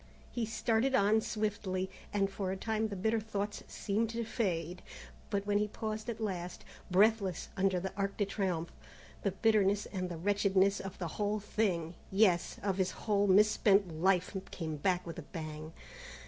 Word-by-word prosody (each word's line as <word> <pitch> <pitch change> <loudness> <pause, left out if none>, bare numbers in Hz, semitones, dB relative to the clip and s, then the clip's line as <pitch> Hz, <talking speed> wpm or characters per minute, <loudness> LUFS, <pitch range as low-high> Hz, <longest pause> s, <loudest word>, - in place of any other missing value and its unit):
He 235 -3 -2
started 230 +3 +1
on 210 +1 +4
swiftly, 205 -4 -2 0.2
and 200 -1 +2
for 195 -1 -3
a 190 - -3
time 220 +2 0
the 205 - -5
bitter 220 +4 +1
thoughts 205 -1 -3
seemed 215 +2 -1
to 230 +1 -2
fade, 180 -6 -2 0.5
but 200 -2 -1
when 205 0 +2
he 210 - +1
paused 215 +2 -4
at 230 - -4
last, 180 -5 -4 0.2
breathless, 195 -1 +3
under 190 -1 +2
the 190 +2 -4
Arc 200 0 -2
de 205 - +2
Triomphe, 185 -4 -2 0.5
the 200 - +1
bitterness 205 0 +3
and 185 -2 -2
the 170 - -5
wretchedness 200 +1 +3
of 195 0 -6
the 175 - -3
whole 210 +1 +1
thing 190 -6 -1 0.2
yes, 190 -3 +3
of 195 -2 0
his 190 -1 +2 0.2
whole 205 -1 +3
misspent 200 -2 +5
life 185 +1 +2
came 160 -3 -4
back 180 +4 +1
with 170 - -6
a - - -4
pang. 155 -2 -7
200 Hz, 170 wpm, -33 LUFS, 185-215 Hz, 0.5 s, misspent